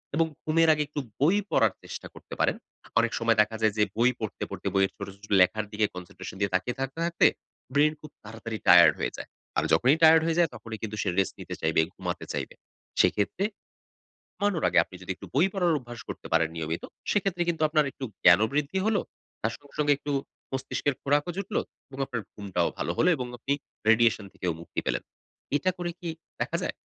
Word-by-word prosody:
এবং 165 +1 +4 0.2
ঘুমের 160 +1 +3
আগে 150 0 0
একটু 150 0 -4 0.2
বই 165 +8 +4
পড়ার - - +3
চেষ্টা - - -7
করতে - - -12
পারেন। - - +3 0.4
অনেক 115 0 +2
সময় 115 -1 +2
দেখা 105 +1 0
যায় 110 -2 +3
যে 105 - +5
বই 120 +2 +4
পড়তে, 110 -2 -4
পড়তে - - -5
বইয়ের 95 0 +3
ছোট, - - -6 0.2
ছোট 105 - -12
লেখার 110 +4 +3
দিকে 105 0 +1
concentration 90 +1 -8
দিয়ে 100 -2 0
তাকিয়ে 95 +7 -1
থাকতে, 135 +3 -3
থাকতে 170 0 +3 0.5
ব্রেইন 150 +2 +4
খুব 155 - -11
তাড়াতাড়ি 110 +1 -6
টায়ার্ড - - +9
হয়ে - - -1
যায়। - - -7 0.3
আর - - +3
যখনই 135 +6 +5
টায়ার্ড 160 0 +8
হয়ে 165 0 0
যায় 170 -4 +4
তখনই 110 -1 -7
কিন্তু 105 -1 -3
সে 95 - 0
রেস্ট 95 - +2
নিতে - - -6
চাইবে, 80 0 +3
ঘুমাতে - - -4
চাইবে। - - -4 0.5
সেক্ষেত্রে 105 - +1 0.9
ঘুমানোর 200 -5 0
আগে - - +3
আপনি - - -16
যদি 95 - -8
একটু - - -10
বই 160 +7 +5
পড়ার 180 -4 +2
অভ্যাস 120 -3 -10
করতে - - -7
পারেন 80 -1 +4
নিয়মিত। 80 +1 -3 0.3
সেক্ষেত্রে 195 -3 +1
কিন্তু 165 -2 0
আপনার 150 -1 +3
একটু 135 - -7 0.2
জ্ঞানও 90 +5 +7
বৃদ্ধি 150 +5 0
হলো, 220 -2 +3 0.4
তার 115 - 0
সঙ্গে, 145 -1 -21
সঙ্গে 145 -1 +4
একটু 145 0 -4 0.4
মস্তিষ্কের 135 +1 -1
খোরাকও 145 +4 +1
জুটল 200 +1 -3 0.3
এবং 135 -1 -11
আপনার 125 -5 -4
ঘুমটাও 95 -4 -1
ভালো - - -2
হলো। 180 - +4
এবং 125 -3 -4
আপনি 135 +4 -1 0.4
radiation 115 -2 +4
থেকেও 90 -2 -2
মুক্তি - - -4
পেলেন। - - 0 0.5
এটা 185 +6 +1
করে 175 -1 -2
কি 175 - -5 0.3
দেখা - - 0
যায়? - - -1
130 Hz, 195 wpm, -27 LUFS, 105-160 Hz, 0.9 s, টায়ার্ড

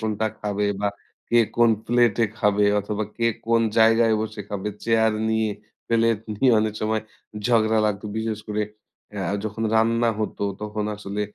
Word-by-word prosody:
কোনটা 110 0 -1
খাবে 105 0 -1 0.2
বা 105 - +1 0.4
কে 120 - +4 0.2
কোন 120 -1 +5 0.2
প্লেট 120 -3 +3 0.2
খাবে 105 0 +3 0.2
অথবা 105 +1 -3
কে 115 - -1 0.2
কোন 115 0 +3 0.2
জায়গায় 115 0 +5
বসে 110 -1 -4
খাবে? 100 0 -3 0.2
চেয়ার 110 -1 +3 0.2
নিয়ে। 110 -1 +1 0.4
প্লেট 115 -2 +2 0.2
নিয়ে 125 +3 +4
অনেক 110 -1 -1
সময় 110 0 0 0.5
ঝগড়া 110 -2 +3
লাগতো। 105 0 -2
বিশেষ 110 -1 -2
করে 105 0 -1 0.5
আ - - -3 0.2
যখন 110 +1 -4
রান্না 115 +1 +3
হতো 105 - -3 0.2
তখন 105 0 -3
আসলে 105 0 -5
110 Hz, 155 wpm, -23 LUFS, 105-115 Hz, 0.5 s, কোন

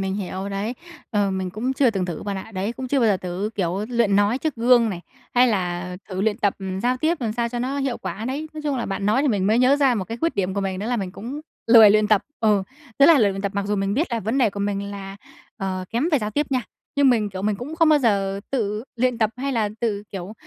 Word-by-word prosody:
mình 190 0 -2
hiểu 195 -1 -4
đấy, 200 +4 -3 0.4
ờ, 205 -3 +1
mình 190 -1 -2
cũng 230 +7 -2
chưa 265 -2 +3
từng 195 -4 -1
thử 175 -3 -5
bạn 200 -1 -3
ạ, 190 +4 -8
đấy, 195 +4 -2
cũng 255 +1 -6
chưa 275 +1 +2
bao 230 - +4
giờ 200 - +3
thử, 185 +3 -4
kiểu, 190 +1 -1
luyện 235 -5 +2
nói 205 +5 +2
trước 310 0 -2
gương 235 -1 +4
này, 180 -3 -5 0.3
hay 250 +1 +5
là 180 -3 -2
thử 185 -2 -4
luyện 210 +1 0
tập 205 -4 +1 0.3
giao 250 +1 +2
tiếp 315 +5 0
làm 225 -3 -1
sao 235 +1 -1
cho 240 +1 -4
nó 260 +3 -2
hiệu 270 -3 -1
quả 215 - -5
đấy. 275 +5 -3
Nói 305 - -6
chung 290 -2 -1
là 240 - -2
bạn 195 +1 -3
nói 220 +6 +3
thì 295 - +2
mình 200 -5 +1
mới 220 +3 +3
nhớ 255 +3 +5
ra 275 -3 +3
một 200 -5 -2
cái 225 +5 -6
khuyết 330 0 0
điểm 190 -1 -1
của 200 - -1
mình 190 -1 -2
đó 205 - -4
là 245 +1 0
mình 195 -4 -3
cũng 250 +8 -6 0.3
lười 225 -3 +9
luyện 210 0 +3
tập, 210 -1 +4 0.2
ừ, 210 -3 +3 0.4
rất 280 - +7
là 330 -3 +7
lười 210 -5 +4
luyện 195 0 -5
tập, 200 -1 -2
mặc 200 0 -1
dù 205 0 0
mình 195 0 0
biết 310 +8 +1
là 230 - 0
vấn 225 +7 -1
đề 240 -5 +3
của 200 - -6
mình 200 0 -2
là, 195 -1 -7 0.4
ờ, 190 -3 -3
kém 240 +8 0
về 295 - +5
giao 210 -3 -3
tiếp 290 +7 0
nha. 255 -2 +1 0.3
Nhưng 280 -2 +5
mình, 215 -4 +1
kiểu, 190 0 -6
mình 210 0 0
cũng 270 +8 -6
không 330 -1 +4
bao 305 -1 +6
giờ 200 -6 +1
tự 215 -4 -1
luyện 250 0 +1
tập 220 -2 +2
hay 275 +2 -2
là 220 -4 +1
tự, 210 -4 -1
kiểu, 190 +1 -6
215 Hz, 285 wpm, -23 LUFS, 195-250 Hz, 0.4 s, lười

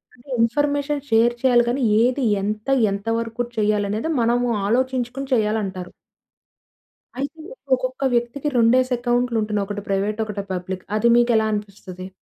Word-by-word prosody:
అంటే 250 +3 -20
information 285 +4 0
share 230 +1 +4
చేయాలి 245 -2 +4
గాని 260 +3 -1 0.2
ఏది 250 +3 +1 0.2
ఎంత 210 +3 -3 0.2
ఎంత 200 +2 -5
వరకు 230 +1 -4 0.2
చెయ్యాలనేది 210 +4 0
మనము 240 +1 +2 0.2
ఆలోచించుకొని 255 +3 -1
చేయాలంటారు. 210 -5 -1 1.3
అయితే 285 +4 -4 0.4
ఒక్కొక్క 255 +1 -4
వ్యక్తికి 240 +4 -1
రెండేసి 250 +2 +4
అక్కౌంట్‌లు 240 -1 0
ఉంటున్నాయి. 210 -1 -1
ఒకటి 205 0 -4
ప్రైవేట్ 200 +2 -1
ఒకటి 205 -2 -5
పబ్లిక్. 185 +1 -5
అది 235 +2 +3
మీకు 240 0 +3
ఎలా 220 - +2
అనిపిస్తది? 195 -3 -6
230 Hz, 135 wpm, -22 LUFS, 210-255 Hz, 1.3 s, share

